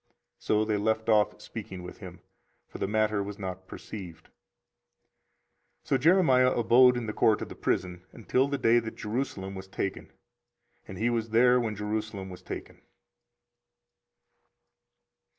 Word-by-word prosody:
So 110 0 +1
they 105 -1 0
left 110 +2 0
off 105 -1 +3
speaking 95 -5 -8
with 90 - -10
him; - - -10 0.5
for - - -10
the - - -1
matter 110 0 +1
was 100 0 -6
not 95 -1 -6
perceived. 90 -6 -9
24:038:028 - - -37 1.5
So 135 - +1
Jeremiah 135 -5 +5
abode 125 +2 +5
in 120 - -3
the 105 - -4
court 110 0 +2
of - - -8
the - - -9
prison 90 -1 -2
until 125 +4 0
the 140 0 -2
day 120 -2 +4
that 110 -1 -7
Jerusalem 105 -4 -4
was 95 0 -8
taken: 95 0 -4 0.8
and 95 - -8
he 120 +4 +1
was 115 -1 -1
there 125 +3 +5
when 110 -3 -2
Jerusalem 105 -2 -4
was 90 - -10
taken. - - -8
110 Hz, 150 wpm, -28 LUFS, 100-120 Hz, 1.5 s, Jeremiah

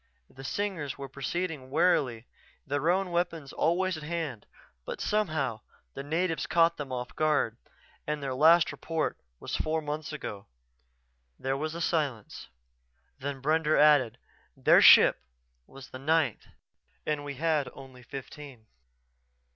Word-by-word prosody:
The 135 - -12
Singers 165 -4 -3
were 140 -1 -6
proceeding 140 +1 -4
warily, 135 -7 +1 0.4
their 145 +3 0
own 185 0 +1
weapons 170 -5 -2
always 180 +2 +1
at - - -8
hand. 150 -8 -4 0.4
But, - - -6
somehow, 155 - -1 0.3
the 135 - -6
natives 165 +3 -1
caught 170 0 +3
them 140 -3 -6
off 125 -1 -5
guard 150 -7 +1 0.5
their 145 -3 -2
last 165 +5 +5
report 160 -1 -3 0.2
was - - -4
four 160 +1 0
months 150 0 -5
ago." 105 -9 -7 0.9
There 135 0 -2
was 155 +3 -3
a 170 - -5
silence, 145 -11 -2 0.7
then 135 -1 -5
Brender 155 +1 +2
added, 145 -6 +5 0.4
"Their - - +5
ship - - +8 0.5
was 135 0 -13
the 130 - -8
ninth 150 -4 +1 0.6
and 150 -1 -1
we 140 -1 -6
had 150 -2 0
only 130 -2 -13
fifteen." 135 -1 -10
150 Hz, 130 wpm, -29 LUFS, 135-165 Hz, 0.9 s, ship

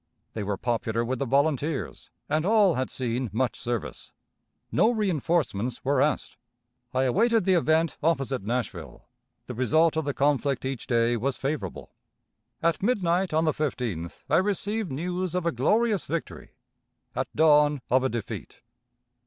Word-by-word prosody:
They 110 - -4
were 100 -1 -2
popular 115 0 -1
with 130 +1 -2
the 140 - 0
volunteers, 140 +1 0 0.2
and 155 0 +1
all 205 -2 +4
had 130 -2 -2
seen 125 -1 -2
much 125 +3 -1
service. 120 -3 -4 0.6
No 225 - +4
reënforcements 155 - 0
were 140 +2 +2
asked. 150 - 0 0.5
I 130 +1 +1
awaited 225 - +2
the 190 - +4
event 160 -1 +2
opposite 135 -5 0
Nashville. 105 - -4 0.4
The - - -6
result 155 +7 +3
of 160 -2 -1
the 145 - -2
conflict 140 -2 +1
each 130 -3 -4
day 120 0 +2
was 130 +3 -2
favorable. 145 +2 -4 0.7
At 165 -1 +1
midnight 190 -4 +1
on 160 +1 +2
the 155 - +2
15th 120 - -3
I - - +3
received 205 +1 0
news 180 +5 -3
of 180 -2 -1
a 170 - +2
glorious 210 - +1
victory; 170 -1 -5 0.6
at - - -1
dawn, 150 -2 +4
of 130 +1 +4
a 130 - +1
defeat. 115 -4 -6
145 Hz, 150 wpm, -26 LUFS, 125-170 Hz, 0.7 s, all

